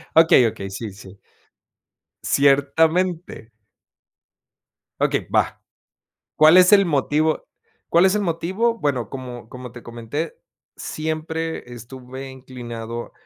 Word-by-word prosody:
Okey, 160 -7 +6
okey, 100 -3 -5
sí, 105 +2 -6
sí. 100 0 -14 1.1
Ciertamente. 155 +1 +1 1.5
Okey, - - 0
va, - - +1 0.8
¿cuál 155 +3 +7
es 180 +2 +7
el 200 -1 +7
motivo 155 +1 +1 0.4
cuál 170 +2 +4
es 190 - +4
el - - 0
motivo? 190 +7 0
Bueno, 135 - -1
como 125 -3 -8
como 125 -1 -9
te 120 - -10
comenté, 120 +7 -5 0.4
siempre 160 -3 -4
estuve 130 +3 -9
inclinado 120 -3 -8
140 Hz, 105 wpm, -22 LUFS, 120-165 Hz, 1.5 s, cuál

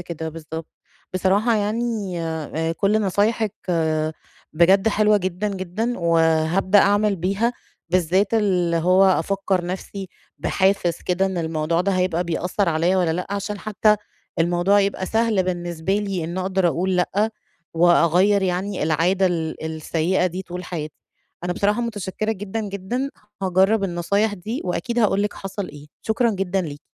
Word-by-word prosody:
كده، 165 -2 -5
بالضبط. 160 0 -7 0.5
بصراحة 200 +5 +2
يعني 210 -3 -2
آآ 160 0 -2
كُلّ 200 +5 +1
نصايحِك 210 +2 +1 1.0
بجد 190 +6 +4
حلوة 210 0 +3
جدًا، 190 +1 -2
جدًا، 200 +5 -3
وهابدأ 165 +3 +3
أعمل 205 +1 +3
بيها، 195 +7 0 0.4
بالذات 185 +4 +2
اللي 180 -6 +2
هو 185 +3 +4
أفكّر 190 -1 +1
نفسي 190 +1 -5 0.3
بحافز 190 -3 +1
كده 185 +2 +2
إن 190 -2 -3
الموضوع 160 0 0
ده 195 +2 +1
هيبقى 180 -2 0
بيأثّر 180 +3 -1
عليَّ 170 +3 +2
والَّا 175 -3 +2
لأ، 180 +2 -3
عشان 200 +1 -3
حتى 210 +1 +2 0.4
الموضوع 175 +4 +3
يبقى 195 -1 -1
سهل 220 -3 +2
بالنسبة 175 -1 -2
لي، 195 -5 -2
إن 170 +3 -4
أقدر 185 -1 +1
أقول 185 +3 0
لأ 200 +4 +1 0.4
وأغيّر 175 +4 +4
يعني 190 +2 -1
العادة 170 +5 +2
ال 160 -3 -2
السيئة 160 +3 0
دي 185 +1 -4
طول 180 0 -7
حياتي. 155 -4 -5 0.5
أنا 180 - 0
بصراحة 205 +5 +1
متشكرة 215 -2 -2
جدًا، 205 +2 -4
جدًا. 220 +8 -3 0.3
هاجرَّب 190 +3 +3
النصايح 200 +4 0
دي، 215 +7 -5
وأكيد 185 +7 -2
هاقول 200 -3 +3
لِك 205 - -2
حصل 195 0 -5
إيه، 145 0 -12 0.2
شكرًا 230 +2 +1
جدًا 195 -2 -1
ليكِ. 145 -4 -6
185 Hz, 145 wpm, -22 LUFS, 170-205 Hz, 1.0 s, بجد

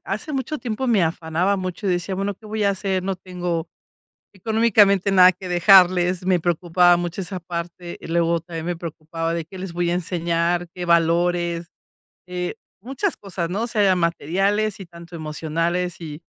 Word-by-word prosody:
hace 215 +10 -4
mucho 270 +3 -2
tiempo 245 +1 -3
me 225 -6 +3
afanaba 165 +4 0
mucho, 185 +2 -4
y - - +2
decía: 175 +2 -1
"Bueno, 200 +2 -2
¿qué 215 - -16
voy 215 0 -2
a 200 - +4
hacer? 195 -1 -1
No 195 0 -1
tengo 175 -2 -4 0.7
económicamente 205 -2 +3
nada 185 -1 +7
que 185 +1 -10
dejarles". 180 0 +5
Me 185 -1 +3
preocupaba 175 +1 +3
mucho 175 +2 -3
esa 185 0 -5
parte. 170 0 -6
Y - - -9
luego 170 0 +1
también, 165 -1 -7
me 175 0 -2
preocupaba 165 0 -4
de 170 -1 -3
¿qué 190 +4 -11
les 190 -1 -5
voy 175 0 0
a - - +1
enseñar?, 175 0 0
¿qué 180 -1 -5
valores? 170 0 +2 0.6
Eh, 180 0 -4 0.2
muchas 270 - -2
cosas, 180 -4 -4
¿no? 210 +5 -1
Sean 205 -5 +2
materiales 195 +6 0
y 195 - -8
tanto 170 0 -12
emocionales, 165 +3 -2
y 155 -1 -8
180 Hz, 175 wpm, -22 LUFS, 170-195 Hz, 0.7 s, nada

